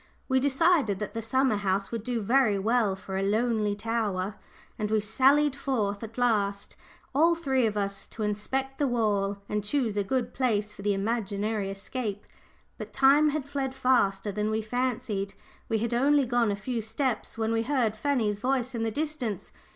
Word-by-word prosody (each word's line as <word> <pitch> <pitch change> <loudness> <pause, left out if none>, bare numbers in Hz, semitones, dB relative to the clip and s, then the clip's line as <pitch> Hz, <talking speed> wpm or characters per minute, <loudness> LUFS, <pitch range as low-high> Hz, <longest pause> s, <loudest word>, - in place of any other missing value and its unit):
We 260 -1 +3
decided 280 - +3
that 210 - -5
the 230 - -3
summer 260 0 +2
house 195 -1 -1
would 230 -3 -3
do 240 -1 -2
very 230 -1 +3
well 215 0 +2
for 190 0 -4
the 195 - 0
lonely 215 -1 +1
tower, 210 -3 -2 0.5
and 210 -1 -1
we 215 0 +3
sallied 270 +7 +3
forth 225 -8 -1
at 225 +1 -8
last, 205 -5 0 0.4
all 330 +4 +4
three 265 -7 +1
of 210 -1 -3
us, 200 -1 -3
to 220 - -6
inspect 265 +6 -2
the 285 - +2
wall 205 -5 0
and 210 0 -2
choose 225 -2 0
a 205 - +2
good 245 +3 -1
place 210 -5 0
for 200 - -11
the 205 0 +1
imaginary 205 -1 -1
escape. 205 +1 -5 0.5
But - - -7
time 280 +3 +5
had 295 -2 -3
fled 275 -2 -3
faster 205 -6 +2
than 210 +2 -1
we 220 0 -1
fancied; 220 -4 -2 0.3
we 225 - +2
had 230 +2 -1
only 280 +3 +3
gone 240 -2 +2
a - - 0
few 230 +3 -3
steps, 235 +2 -2
when 225 0 0
we 225 - +2
heard 235 -4 0
Fanny's 220 -4 0
voice 255 +1 0
in 230 - -3
the 225 - 0
distance. 255 - -3
225 Hz, 180 wpm, -28 LUFS, 205-260 Hz, 0.5 s, time